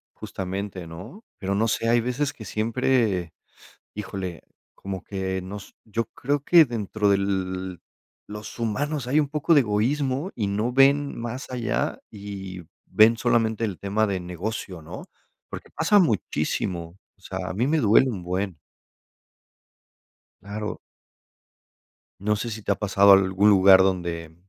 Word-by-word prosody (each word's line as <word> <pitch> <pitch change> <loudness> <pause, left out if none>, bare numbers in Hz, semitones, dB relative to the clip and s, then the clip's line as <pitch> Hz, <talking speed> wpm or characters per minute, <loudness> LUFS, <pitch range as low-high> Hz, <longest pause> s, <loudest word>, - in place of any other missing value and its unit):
Justamente, 95 -1 -5
¿no? 100 - -10
Pero 95 0 -2
no 110 +3 +1
sé, 115 +1 0
hay 120 0 +4
veces 130 +4 -1
que 110 - -11
siempre 110 -5 0 0.6
híjole, 95 -4 -5 0.3
como 95 -1 -6
que 95 -1 -3
nos 100 +2 -9
yo 115 +1 -2
creo 145 +2 -1
que 165 +2 +6
dentro 110 -3 -1
del 95 -2 -1 0.5
los 105 +2 -8
humanos 135 +5 -2
hay 140 +4 +3
un 145 -2 0
poco 150 +2 +2
de 145 - +7
egoísmo, 130 - 0
y 105 -4 -1
no 105 +5 -1
ven 140 +2 +4
más 120 +3 -5
allá 120 -3 -2
y 100 -3 -7 0.2
ven 110 +2 +5
solamente 115 -1 +1
el 100 -5 -3
tema 100 +2 0
de 100 -3 -2
negocio, 90 0 -5
¿no?, 80 - -9 0.4
porque - - -8
pasa 185 +6 +3
muchísimo, 90 - -1 0.2
o - - -31
sea, 95 0 -5
a - - -4
mí 115 +7 0
me 160 +2 +2
duele 130 0 +4
un 100 -5 -5
buen. 90 0 -3 1.8
Claro. 105 +1 -5 1.4
No 105 +1 +1
sé 105 +3 -3
si 110 -1 -6
te - - 0
ha - - +2
pasado 100 0 +4
algún 95 +1 +5
lugar 95 -1 +7
donde 85 -4 -2
105 Hz, 145 wpm, -24 LUFS, 95-120 Hz, 1.8 s, de